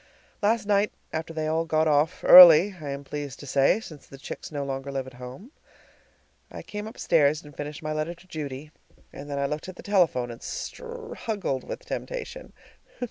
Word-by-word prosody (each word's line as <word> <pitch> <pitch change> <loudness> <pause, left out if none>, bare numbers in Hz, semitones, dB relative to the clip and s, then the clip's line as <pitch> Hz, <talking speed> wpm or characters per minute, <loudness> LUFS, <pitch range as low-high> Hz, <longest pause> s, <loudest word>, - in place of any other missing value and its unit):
Last 215 +1 +1
night, 205 0 +2 0.2
after 160 +1 -4
they 160 -1 -3
all 160 +1 0
got 160 -1 +1
off, 150 +3 +1
early, 180 +2 +10
I 145 - -6
am 140 0 -5
pleased 145 -1 -6
to - - -9
say, 140 +8 +3
since 155 -10 -12
the 135 - -12
chicks 135 - -8
no 145 -2 -3
longer 135 0 -5
live 135 -1 -3
at 130 - -12
home, 130 - -10 1.0
I - - -8
came 210 0 -6
upstairs 155 - +1
and 145 -2 -14
finished 150 +2 -7
my 155 0 -2
letter 155 +3 -3
to 175 - -20
Judy, 150 -3 -7 0.4
and 145 +1 -9
then 140 - -3
I 140 - 0
looked 150 +5 -4
at 185 - -9
the - - -12
telephone 165 -12 +1
and 115 - -11
struggled 455 - -5
with - - -8
temptation. - - -6
155 Hz, 190 wpm, -26 LUFS, 140-190 Hz, 1.0 s, early